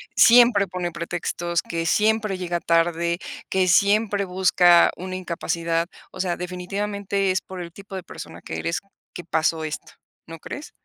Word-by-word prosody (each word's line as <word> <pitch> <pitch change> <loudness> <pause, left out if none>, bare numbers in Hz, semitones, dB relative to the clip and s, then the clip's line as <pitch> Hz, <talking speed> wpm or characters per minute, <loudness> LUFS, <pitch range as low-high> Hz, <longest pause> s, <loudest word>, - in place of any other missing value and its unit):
siempre 235 -4 +6
pone 180 -1 -3
pretextos, 170 0 -3
que 165 0 -3
siempre 215 +1 +2
llega 175 -1 -2
tarde, 170 0 +1 0.3
que 185 -1 +2
siempre 200 +2 +3
busca 180 -2 +5
una 185 +1 -6
incapacidad. 170 -2 -2 0.2
O 185 - -11
sea, 180 -2 -1
definitivamente 195 +2 -2
es 185 - 0
por 185 -1 -9
el 170 -1 -7
tipo 200 -1 -10
de 185 - -5
persona - - -10
que 80 - -5
eres 170 - -2 0.3
que 175 - -6
pasó 160 -1 0
esto, 155 -1 -6 0.3
¿no 165 - -8
crees? 285 - -8
180 Hz, 155 wpm, -23 LUFS, 170-200 Hz, 0.3 s, siempre